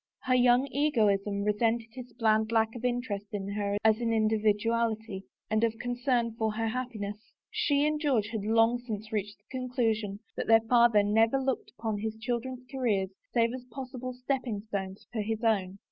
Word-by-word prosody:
Her 255 - +1
young 250 +1 +5
egoism 210 -8 +1
resented 225 +2 +1
his 250 0 -9
bland 220 -1 +2
lack 225 -1 +2
of 240 - -7
interest 240 -5 -2
in 200 -1 -3
her 200 0 -1
as 220 +1 +4
an 230 -1 +1
individual 220 +1 +2
ity 200 -4 -8 0.2
and 215 +1 +1
of 225 -1 +1
concern 245 0 0
for 220 -1 +1
her 225 +1 -1
happiness; 220 -4 -5 0.2
she 295 -10 +2
and 300 0 0
George 245 -9 +1
had 220 -3 -3
long 225 +2 +3
since 220 -2 -6
reached 210 -1 -3
the 205 - -41
conclusion 225 -5 -1 0.2
that - - -3
their 225 0 +6
father 235 -2 +5
never 225 +5 +3
looked 265 -1 -2
upon 220 -1 -2
his 220 +1 -3
children's 245 +2 -3
careers 230 -8 -1 0.2
save 235 -1 +2
as 255 -1 -7
possible 255 +1 -6
stepping 250 -4 -2
stones 195 -2 -5
for 220 - -1
his 220 +2 -3
own. 195 -4 +1
225 Hz, 175 wpm, -29 LUFS, 210-245 Hz, 0.2 s, their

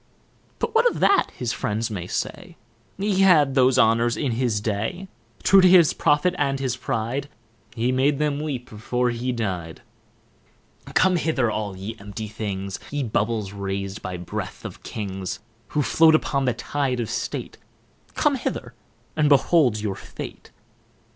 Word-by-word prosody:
But 455 - -2
what 465 +2 +5
of - - -6
that, 400 - +4
his 120 -1 -2
friends 110 +2 -2
may 90 -4 -4
say, - - -4 0.4
He 195 0 0
had 155 -8 +5
those 130 -1 +4
honours 115 0 +3
in 140 -4 -1
his 115 -2 0
day. 110 - -3 0.4
True 195 0 +7
to 185 - +7
his 175 -4 +6
profit 150 +5 +2
and 140 -2 +1
his 130 -3 -1
pride, 130 +2 -3 0.5
He 120 +2 +1
made 135 +3 +2
them 150 -1 0
weep 140 -5 -4
before 120 +3 -1
he 120 +2 -2
dy'd. 95 -9 -4 1.1
Come 185 -1 +4
hither, 140 -8 +1
all 100 -3 -3
ye 100 +4 -6
empty 105 +2 -6
things, 100 -3 -4
Ye 145 -1 -2
bubbles 110 -3 -1
rais'd 100 0 -4
by 90 -1 -5
breath 90 -1 -6
of - - -8
Kings; 95 -3 -5 0.3
Who 150 - 0
float 160 +6 +5
upon 140 -3 0
the 125 -2 +1
tide 135 0 -2
of 115 - -2
state, - - -4 0.6
Come - - +2
hither, - - -4 0.4
and 150 -2 +3
behold 140 -5 +4
your 105 -2 -2
fate. - - -9
125 Hz, 155 wpm, -24 LUFS, 105-145 Hz, 1.1 s, True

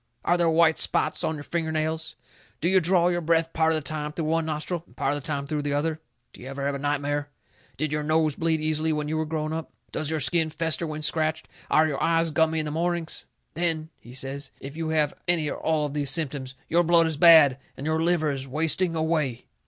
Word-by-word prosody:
Are 175 - +3
there 170 -1 +2
white 160 0 +4
spots - - +1
on 160 - -1
your 145 - -7
finger 165 0 -2
nails? 160 +1 -2 0.4
Do 165 - 0
you 190 +1 +5
draw 175 0 +3
your 175 0 0
breath 165 0 +1
part 160 0 +2
of - - +2
the 155 -2 -3
time 150 -1 -4
through 155 +1 -4
one 160 +1 0
nostril 160 +2 -3
and - - -23
part 135 - 0
of 145 - -3
the - - -8
time 140 -2 -2
through 150 +1 -2
the 145 -1 -2
other? 155 +2 -1 0.3
Do - - -13
you 125 - -9
ever 140 +1 -4
have 140 -1 -2
nightmare? 145 0 -1 0.5
Did 155 -1 -1
your 150 0 -1
nose 155 -1 +1
bleed 160 -1 0
easily 155 +1 0
when 150 -1 -2
you 155 - -2
were 155 0 -1
growing 155 0 -2
up? 160 0 -4 0.2
Does 155 - -2
your 160 -1 -1
skin 165 +1 +2
fester 160 +1 -1
when 155 0 -5
scratched? 155 0 0 0.2
Are 155 +1 +4
your 145 -3 -3
eyes 165 -1 +2
gummy 160 +2 +2
in 155 - -1
the 150 - -3
mornings? 170 +1 -2 0.3
Then," 160 -1 -1
he 120 +1 -13
says, 135 +2 -4
"if 140 +2 -8
you 160 -1 -3
have 155 -2 +1
any 170 -4 +2
or - - -4
all 155 -2 0
of 145 - -5
these 145 -2 +2
symptoms, 135 -3 0
your 170 +2 +3
blood 170 -1 +4
is 160 -1 -1
bad, 145 -4 +7 0.2
and 135 - -6
your 160 +1 0
liver 165 -3 +2
is 135 -1 -5
wasting 165 +5 +2
away." 155 -6 -1
155 Hz, 240 wpm, -25 LUFS, 150-165 Hz, 0.5 s, bad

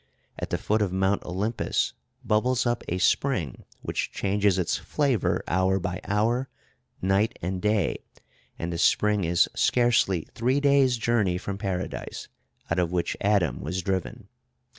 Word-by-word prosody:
At - - -4
the - - 0
foot 110 +1 0
of 100 -3 +1
Mount 95 +2 +1
Olympus 100 +6 -1 0.3
bubbles 125 +4 +2
up 120 -1 0
a 90 - -1
spring 95 - 0 0.2
which - - -2
changes 100 -1 +1
its 90 -3 0
flavor 135 - 0
hour 95 +2 +2
by 90 +2 -4
hour, 115 +6 0 0.5
night 95 +3 +1
and 90 +1 -2
day, 105 -6 +1 0.6
and 85 +1 -3
the 85 - -3
spring 105 +1 +3
is 85 +1 +3
scarcely 120 -8 +2
three 125 +4 +1
days' 140 -3 +4
journey 110 -6 +1
from 100 +2 -5
Paradise, 95 -2 -4 0.4
out 85 - +2
of 85 -1 0
which 90 -1 -1
Adam 95 -11 +1
was 90 +4 -3
driven. 95 -2 -3
100 Hz, 145 wpm, -26 LUFS, 90-115 Hz, 0.6 s, days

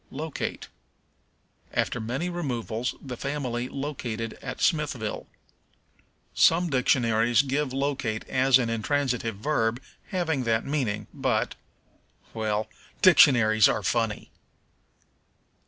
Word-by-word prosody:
Locate. 155 +2 -5 1.1
"After 125 - 0
many 130 +10 -2
removals 125 -9 -3
the 130 -3 -7
family 125 -2 -3
located 125 -6 -4
at - - -6
Smithville." 145 - -1 1.1
Some 170 0 +4
dictionaries 120 -1 +3
give 140 0 -1
locate 135 -5 -2
as 130 0 +4
an 125 -3 -1
intransitive 120 -1 -1
verb 115 0 0 0.3
having 160 -8 -1
that 115 -1 +1
meaning, 120 -8 -1
but - - 0 0.8
well, 110 -1 -1 0.4
dictionaries 120 - +6
are 105 - -1
funny. 115 +1 -1
125 Hz, 95 wpm, -26 LUFS, 115-145 Hz, 1.1 s, dictionaries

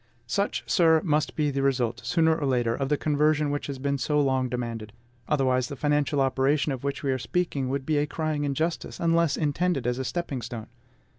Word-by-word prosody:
Such, 200 +12 -1
sir, 165 -3 +4
must 150 -3 0
be 150 -2 +1
the 135 0 -1
result 125 -4 0
sooner 160 +7 +3
or 145 -3 -2
later 120 -3 +1
of 135 +2 -2
the 150 - +2
conversion 150 0 +2
which 145 - -3
has 140 -2 -4
been 140 +1 -1
so 150 +3 +1
long 130 -2 +1
demanded; 115 -3 -4 0.4
otherwise, 130 -4 +2
the 140 - -6
financial 145 0 +1
operation 135 +3 +2
of 130 -1 -5
which 140 +1 -3
we 135 - +1
are 130 - -1
speaking 140 0 -1
would 135 0 -2
be 155 0 +1
a 145 - 0
crying 155 -2 -2
injustice, 155 +4 -2
unless 170 -3 +2
intended 150 -2 0
as 125 +1 0
a - - -1
stepping 140 -4 -3
stone. 115 -1 -7
140 Hz, 205 wpm, -26 LUFS, 130-155 Hz, 0.4 s, sir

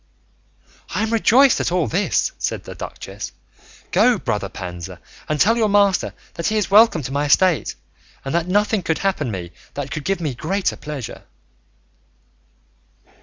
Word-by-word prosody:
"I 210 - +1
am 220 +1 -1
rejoiced 245 +4 +5
at - - 0
all 175 -3 +2
this," 195 +5 0
said - - -2
the - - -8
duchess; - - -7 0.6
"go, 245 -2 +4
brother 105 - -2
Panza, 90 -1 -7 0.3
and 150 -1 0
tell 225 +7 +4
your 220 -2 +2
master 200 -2 +2 0.2
that 170 - -2
he 215 - +1
is 210 -2 -1
welcome 210 -7 +6
to 130 - -5
my 145 +1 0
estate, 175 +3 +3 0.5
and 135 - -3
that 170 0 +1
nothing 205 +2 +2
could 160 -2 0
happen 190 -8 -1
to 115 - -3
me 90 -2 -6 0.2
that 140 -1 -4
could 150 +1 -4
give 195 +3 0
me 155 -5 -2
greater 185 +9 -1
pleasure." 145 -5 -7
170 Hz, 165 wpm, -21 LUFS, 140-205 Hz, 0.6 s, welcome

